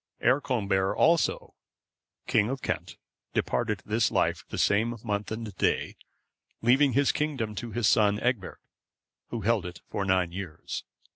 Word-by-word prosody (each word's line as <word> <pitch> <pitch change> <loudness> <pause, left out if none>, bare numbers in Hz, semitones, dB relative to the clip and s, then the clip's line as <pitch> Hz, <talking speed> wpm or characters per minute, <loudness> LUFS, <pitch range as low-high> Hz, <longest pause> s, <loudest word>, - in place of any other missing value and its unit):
Earconbert,(518) 110 -7 +2
also, 165 0 +2 0.7
king 105 - +2
of 135 0 -4
Kent, - - -3 0.4
departed 105 -2 0
this 115 +2 +2
life - - +1
the - - -5
same 115 +3 +2
month 105 -2 -2
and 110 -3 -5
day; - - 0 0.7
leaving 130 +3 +4
his 140 +2 +3
kingdom 135 -8 -2
to 105 +4 -5
his 120 -1 +1
son 105 -1 +4
Egbert, 120 -6 -1 0.7
who 115 - -4
held 110 -1 +2
it 90 0 -8
for 100 - -1
nine 95 -3 +2
years. 90 -3 -6
110 Hz, 140 wpm, -28 LUFS, 100-120 Hz, 0.7 s, leaving